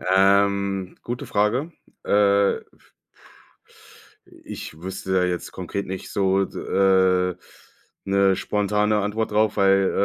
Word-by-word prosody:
ähm, 100 -1 +2
gute 120 +1 -5
Frage. 120 +11 0 0.3
Äh, 100 -1 +3 1.8
ich 80 - -9
wüsste 95 0 -5
da 90 -1 +3
jetzt 90 -1 -3
konkret 95 +2 -5
nicht 95 0 -6
so, 95 -1 +1
d - - -9
äh, 95 -2 +2 0.7
'ne 100 -1 +3
spontane 105 +1 0
Antwort 105 +2 -2
drauf, 110 0 +1
weil, 95 -1 +3
100 Hz, 105 wpm, -23 LUFS, 95-105 Hz, 1.8 s, Äh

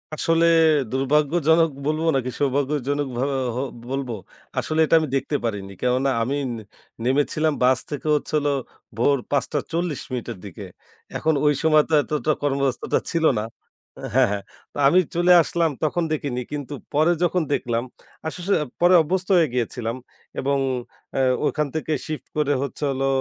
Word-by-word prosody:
আসলে 165 +1 +2 0.5
দুর্ভাগ্যজনক 150 +4 +3 0.2
বলব 155 +1 0
নাকি 130 -1 -1
সৌভাগ্যজনক 145 0 0
ভাবে 135 +2 0 0.6
বলব। 135 -2 -2 0.5
আসলে 155 0 -2
এটা 165 - +3
আমি 155 - -2
দেখতে 135 +2 -1
পারিনি। 100 -3 -3
কেননা 125 +2 +1
আমি 135 +4 -1 0.7
নেমেছিলাম 145 +3 +1
বাস 130 0 +4
থেকে 145 +1 -4
হচ্ছিল 150 0 -1 0.5
ভোর 140 +4 +3
৫ঃ৪০ 155 +2 -1
মিনিটের 125 -6 -4
দিকে। 95 - -8 0.5
এখন 160 - +1
ঐ - - +5 0.2
সময় 155 -1 +5
তো 160 - -2
এতটা 150 +1 -1
কর্মাবস্থাটা 140 -2 0
ছিল 165 -2 +1
না। 105 - -2 0.7
হ্যা, - - +5
হ্যা, 100 - -1 0.3
তো - - -10
আমি 180 +6 +5 0.2
চলে 175 +1 +4
আসলাম 170 0 0
তখন 170 +3 +1
দেখিনি 140 -5 -2
কিন্তু 145 -1 -5 0.2
পরে 155 +4 +4
যখন 175 0 +2
দেখলাম, 120 -3 -1 0.4
আসলে 180 +4 -2 0.3
পরে 175 +1 +6
অভ্যস্ত 185 +4 -1
হয়ে 165 - +4
গিয়েছিলাম 120 -1 -2 0.4
এবং 140 +1 +1 0.6
অ্যা 135 - 0 0.3
ওখান 150 -1 0
থেকে 160 0 -2
শিফট 155 -1 -6
করে 145 -1 +2
হচ্ছে 140 +2 -5
হলো 135 +1 -1
145 Hz, 140 wpm, -23 LUFS, 135-160 Hz, 0.7 s, পরে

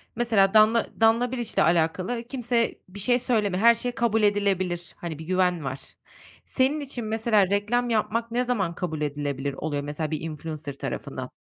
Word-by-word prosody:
Mesela 220 -5 +3
Danla 220 +2 +5
Danla 230 +2 +4
Biliç'le 240 -3 -4
alakalı 175 +8 +1
kimse 240 -2 -1
bir 205 +2 -10
şey 245 +5 +2
söylemiyor, 210 -6 0
her 235 0 +8
şey 245 +2 -2
kabul 230 -2 +1
edilebilir, 190 -4 0
hani, 160 -3 -6
bir 160 - -8
güven 180 -2 +1
var. 135 0 -4 0.7
Senin 275 +3 +1
için 260 -5 -5
mesela 215 -3 +2
reklam 220 +5 0
yapmak 230 +1 0
ne 245 +1 +1
zaman 200 -9 -1
kabul 160 -4 -4
edilebilir 145 -1 -2
oluyor 145 0 -3
mesela 150 +2 -4
bir 155 - -2
influencer 155 -2 -6
tarafından? - - -5
205 Hz, 165 wpm, -25 LUFS, 165-235 Hz, 0.7 s, her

